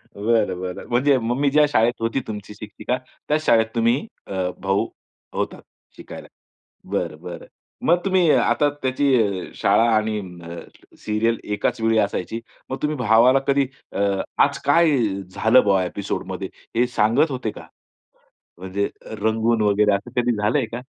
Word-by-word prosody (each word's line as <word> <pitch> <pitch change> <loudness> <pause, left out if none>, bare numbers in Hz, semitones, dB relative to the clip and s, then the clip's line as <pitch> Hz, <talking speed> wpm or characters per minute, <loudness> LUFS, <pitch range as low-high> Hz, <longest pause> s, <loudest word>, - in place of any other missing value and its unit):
बरं, 105 -3 +1
बरं. 90 -1 -5
म्हणजे 130 +3 +3
मम्मी 125 +5 0
ज्या 150 +1 +5
शाळेत 120 -3 +3
होती 115 +3 0
तुमची 105 -1 -7
शिक्षिका. 110 +4 -4 0.3
त्याच 155 +1 0
शाळेत 115 -1 +5
तुम्ही 115 - +1 0.2
अ, - - -6 0.3
भाऊ 95 0 +1 0.5
होतात - - -3 0.4
शिकायला. - - -10 0.6
बरं, 85 -6 -2
बरं. 85 -2 -8 0.4
मग 170 - +5
तुम्ही 185 -4 +3
आता 145 0 +3
त्याची 130 +2 0 0.5
शाळा 105 +4 +3
आणि 110 0 0 0.3
अ, 85 0 -7 0.4
सीरियल 110 +2 0
एकाच 105 +2 -1
वेळी 115 0 +2
असायची, 105 +1 -1 0.3
मग 130 - -3
तुम्ही 150 0 0
भावाला 120 +3 +5
कधी 140 0 +3 0.3
अ, - - -3 0.4
आज - - -2
काय 165 -2 +4 0.4
झालं 120 +3 +5
ब्वॉ 100 -2 +3
एपिसोड 95 +2 -4
मध्ये, - - -4 0.3
हे 120 +2 +4
सांगत 115 +9 +3
होते 125 -4 -3
का? - - -12 0.9
म्हणजे 95 +2 -2 0.3
रंगून 110 +1 +1
वगैरे 105 0 +3
असं 100 +1 -4
कधी 120 0 +1
झालंय 105 +3 +1
का? 120 - -4
115 Hz, 145 wpm, -22 LUFS, 105-130 Hz, 0.9 s, ज्या